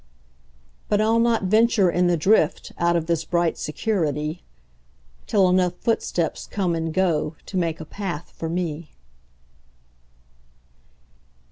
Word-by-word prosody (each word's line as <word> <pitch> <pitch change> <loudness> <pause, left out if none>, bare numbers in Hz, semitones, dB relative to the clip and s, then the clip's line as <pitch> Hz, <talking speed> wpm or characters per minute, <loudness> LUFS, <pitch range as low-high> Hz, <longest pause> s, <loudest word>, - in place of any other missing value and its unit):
But 205 - +2
I'll 220 +2 +3
not 230 -2 +2
venture 215 -1 +3
in 180 +1 +2
the 175 -1 +2
driftOut 170 -1 +1
of 165 -2 0
this 170 -2 0
bright 170 -2 0
security, 155 -3 -2 0.9
Till 195 -3 +3
enough 180 -1 +2
footsteps 180 -8 -1
come 185 -4 -1
and 165 -1 -2
goTo 165 -2 -1
make 170 -3 -1
a 160 - -7
path 175 -2 -6
for 165 - -4
me. 165 -2 -4
175 Hz, 115 wpm, -23 LUFS, 160-200 Hz, 0.9 s, I'll